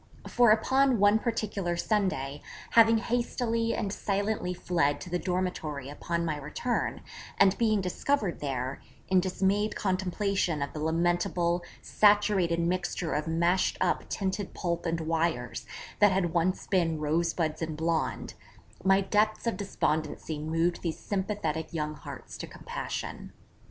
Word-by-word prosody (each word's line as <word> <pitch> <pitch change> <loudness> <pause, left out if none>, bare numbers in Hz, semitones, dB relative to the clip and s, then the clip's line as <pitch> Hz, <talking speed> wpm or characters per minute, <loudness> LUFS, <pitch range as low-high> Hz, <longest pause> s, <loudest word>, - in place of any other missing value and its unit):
For 240 -1 +4
upon 260 +4 +4
one 205 +2 +5
particular 205 -6 -2
Sunday, 170 -10 -1 0.3
having 225 0 +6
hastily 230 0 0
and 200 -1 -2
silently 200 -2 -1
fled 165 -5 0
to 180 - -8
the 180 - 0
dormitory 175 -7 -2
upon 170 +3 -2
my 155 -2 -1
return, 150 - -2 0.4
and 195 0 +5
being 215 -3 +3
discovered 195 +2 -1
there, 135 -2 -3 0.3
in 190 -1 +5
dismayed 195 +3 0
contemplation 185 -4 0
of 140 - -6
the 155 - -5
lamentable 175 +1 +1 0.2
saturated 205 -5 +3
mixture 175 -1 -1
of 150 +2 -1
mashed 170 +3 +2
up - - 0
tinted 195 0 -3
pulp 170 -1 -2
and 165 0 -1
wires, 160 -6 -1 0.3
that 205 -1 +6
had 180 -3 0
once 180 +2 +1
been 170 -5 +1
rosebuds 160 +1 0
and 160 -2 -3
blonde, 160 0 -1 0.5
my 195 +1 +5
depths 215 +3 +1
of 230 - 0
despondency 155 -5 -2
moved 165 +3 0
these 165 -3 -2
sympathetic 190 -6 -2
young 150 -1 -1
hearts 150 - -9
to - - -5
compassion. - - -6
180 Hz, 135 wpm, -29 LUFS, 160-205 Hz, 0.5 s, having